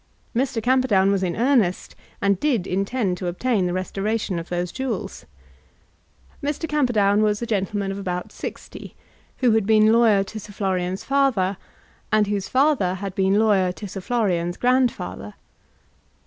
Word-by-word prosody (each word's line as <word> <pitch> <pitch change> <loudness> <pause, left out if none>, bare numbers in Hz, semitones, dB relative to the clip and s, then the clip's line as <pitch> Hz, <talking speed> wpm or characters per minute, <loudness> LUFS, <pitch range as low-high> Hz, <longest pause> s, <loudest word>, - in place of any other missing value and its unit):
Mr. 250 -2 -1
Camperdown 240 -6 +3
was 195 -1 +1
in 180 -2 -1
earnest, 230 -7 +1 0.3
and 200 -2 +2
did 245 -10 +1
intend 195 0 -1
to 180 - -3
obtain 195 +2 0
the - - -2
restoration 195 +1 -2
of 165 - -9
those 175 0 -2
jewels. 260 -7 -5 1.2
Mr. 295 +3 -2
Camperdown 220 -9 +2
was 210 -1 +1
a 235 - -3
gentleman 200 -2 -1
of 195 - -5
about 180 -2 -4
sixty, - - -8 0.5
who 240 - +6
had 220 -2 +2
been 215 0 +5
lawyer 225 -4 +4
to 215 +3 -8
Sir 205 0 -11
Florian's 190 -1 -2
father, 260 -9 +1 0.6
and 215 -1 +4
whose 200 -1 -2
father 260 -9 +2
had 195 0 -5
been 190 +1 +2
lawyer 200 -4 +3
to 205 - -8
Sir 195 0 -7
Florian's 185 -7 -1
grandfather. 245 - 0
205 Hz, 150 wpm, -23 LUFS, 185-235 Hz, 1.2 s, who